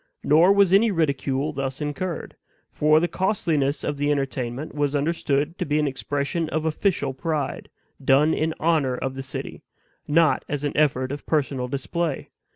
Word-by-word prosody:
Nor 165 +6 +5
was 200 -2 +4
any 215 +4 +5
ridicule 145 -4 0
thus 135 -1 -3
incurred; 155 +4 -4 0.4
for 155 +1 +4
the 175 - +1
costliness 165 -8 0
of 145 - -2
the 145 +1 0
entertainment 135 -1 -2
was 145 -1 0
understood 150 +1 0
to - - +1
be 150 +1 0
an 150 - +2
expression 145 +4 -2
of 155 0 -2
OFFICIAL 160 -3 0
pride, 150 0 -3 0.3
done 145 +4 +4
in 160 0 -1
honor 155 -6 +2
of 130 +1 -3
the 135 - -5
city, 130 -1 -6 0.5
not 160 +1 +3
as 145 -1 -2
an 145 - -2
effort 135 -3 +1
of 145 - -7
personal 135 -5 0
display. 145 +4 -3
150 Hz, 160 wpm, -24 LUFS, 135-160 Hz, 0.5 s, Nor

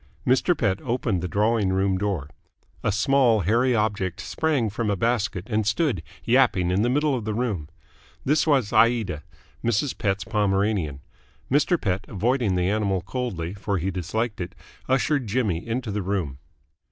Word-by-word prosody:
Mr. 135 +7 +3
Pett 100 -6 0
opened 115 -6 -1
the 90 - -2
drawing 105 +1 +1
room 95 0 +1
door. 95 -7 -2 0.6
A - - +2
small 120 +1 +3
hairy 120 +7 +2
object 100 -4 -1
sprang 120 +7 0
from 105 +1 -2
a 100 - +1
basket 100 -3 0
and 110 -2 0
stood 125 - +1 0.2
yapping 110 -8 +3
in 95 +3 +2
the 120 - +2
middle 145 +3 +2
of 125 -4 -2
the 110 0 -2
room. 105 -11 -2 0.6
This 150 +4 +2
was 135 -8 +2
Aida, 115 -10 +3 0.4
Mrs. 120 +4 0
Pett's 95 -1 -1
Pomeranian. 100 -8 0 0.5
Mr. 150 +5 +3
Pett, 95 -1 -1
avoiding 115 0 0
the 90 0 +1
animal 100 -2 0
coldly, 95 -5 -4
for 100 0 -2
he 95 +3 -1
disliked 105 +5 -2
it, 85 - -6 0.3
ushered 135 0 +1
Jimmy 100 -7 0
into 115 -1 -2
the 105 +1 -2
room. 90 -8 -2
105 Hz, 160 wpm, -24 LUFS, 95-120 Hz, 0.6 s, Mr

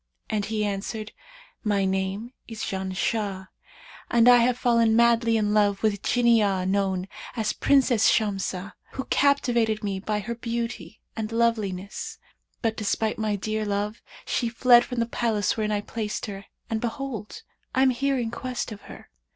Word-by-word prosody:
and 210 -2 0
he 215 -1 -1
answered, 210 +2 -4 0.5
'My 205 -3 +1
name 190 +5 -2
is 225 -2 -6
Janshah, 190 +1 -2 0.6
and 235 0 +4
I 245 0 +9
have 240 +1 +3
fallen 230 -3 +3
madly 235 -1 +4
in 210 -1 +1
love 205 -1 +2
with 215 -1 +3
a - - -5
Jinniyah 210 -5 +2
known 190 -1 0 0.3
as 220 -3 0
Princess 260 -5 +4
Shamsah, 195 -3 -1 0.2
who 265 - -3
captivated 240 -6 +2
me 195 -2 -2
by 210 +2 -2
her 235 +4 -4
beauty 235 -1 -4 0.2
and 220 -1 -4
loveliness; 215 -5 -1 0.5
but 225 -1 +1
despite 215 +1 -1
my 215 -1 0
dear 215 +2 -2
love 205 +1 -2 0.2
she 235 - 0
fled 240 +1 +6
from 245 - -4
the - - +2
palace 225 -3 0
wherein 215 -1 -1
I 205 -1 0
placed 210 0 -4
her 200 -1 -7 0.2
and 220 -1 -2
behold, 245 - -5 0.3
I 260 - +4
am 265 - +5
here 275 +2 0
in 235 -2 -2
quest 250 0 -4
of 205 - -8
her.' - - -12
220 Hz, 160 wpm, -25 LUFS, 205-235 Hz, 0.6 s, I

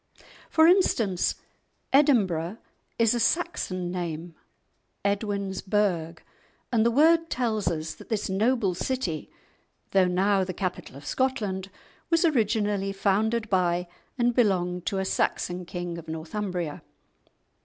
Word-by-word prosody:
For 320 - +5
instance, 235 - +3 0.6
"Edinburgh" 210 - +3 0.4
is 230 -1 +4
a 240 - 0
Saxon 190 - 0
name—Edwin's 190 +4 -5
burgh—and 195 +3 -2
the 235 - +4
word 330 +6 +4
tells 220 -6 -1
us 160 -2 -2
that - - -15
this 220 -3 -1
noble 210 0 +1
city, 185 - -3 0.6
though 190 -2 +4
now 190 +2 +2
the 185 -1 -5
capital 185 -8 -4
of 140 - -12
Scotland, 200 - -1 0.4
was 330 +1 +3
originally 210 -8 +1
founded 215 +4 +1
by 180 -2 +1 0.3
and 240 -1 +2
belonged 180 -6 +1
to 200 - 0
a 190 - -1
Saxon 180 -1 -1
king 175 -1 -5
of 165 - -12
Northumbria. 165 0 -4
195 Hz, 115 wpm, -26 LUFS, 180-230 Hz, 0.6 s, For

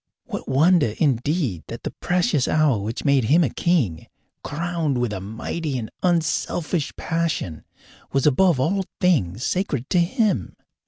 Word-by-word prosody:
What - - -6
wonder 145 -3 +3
indeed 135 - 0
that - - -8
the - - -3
precious 175 -6 0
hour 150 -8 +3
which 110 +7 -5
made 140 -4 +3
him 160 +9 +4
a 130 - 0
king, 125 - 0 0.4
crowned 165 -2 -2
with 120 -3 -1
a 95 - -3
mighty 130 - -4
and 110 -3 -5
unselfish 170 -1 0
passion, 160 - -2 0.5
was 135 -1 +1
above 155 +1 +4
all 190 +8 +1
things 130 - +1
sacred 145 -9 -1
to 180 - +4
him? 185 - 0
150 Hz, 145 wpm, -23 LUFS, 120-170 Hz, 0.5 s, him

